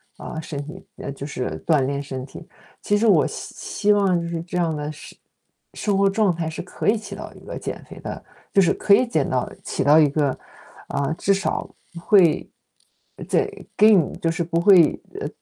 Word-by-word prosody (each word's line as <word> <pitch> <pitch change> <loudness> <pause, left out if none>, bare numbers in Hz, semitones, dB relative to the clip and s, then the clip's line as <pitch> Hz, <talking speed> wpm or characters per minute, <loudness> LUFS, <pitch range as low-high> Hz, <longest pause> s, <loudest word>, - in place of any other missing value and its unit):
啊， 160 - -7
身 150 -2 -6
体 175 +5 -10 0.2
呃， 140 - -5
就 140 0 -7
是 130 -3 -4
锻 155 -4 +4
炼 140 +2 -1
身 130 -2 -6
体。 160 +4 -12 0.3
其 205 - +1
实 220 - +1
我 210 - +5
希 - - -8
希 210 0 0
望 195 -4 +3
就 - - -4
是 170 -1 -3
这 180 +1 -5
样 170 -2 +1
的 150 0 -4
事 155 - -11 0.6
生 205 -2 -1
活 195 0 +4
状 200 -2 +2
态 165 -1 -3
是 160 - -6
可 180 - -6
以 220 - +4
起 215 - -9
到 - - -8
一 - - -16
个 - - -6
减 - - -6
肥 - - -10
的， - - -7 0.3
就 195 - +6
是 180 - +3
可 200 - +3
以 255 - +3
减 160 - 0
到 125 -1 -1
起 - - -2
到 145 +3 +6
一 155 - +6
个， 145 0 +1 0.6
啊， 140 +1 -1
至 200 - +2
少 195 - -2 0.4
会， 180 -6 +4 0.8
在 - - +1 0.2
更 205 -7 +5
就 165 - +1
是 170 0 -2
不 170 0 0
会 180 -4 +6 0.2
呃， - - -3
170 Hz, 220 characters per minute, -22 LUFS, 150-195 Hz, 0.8 s, 就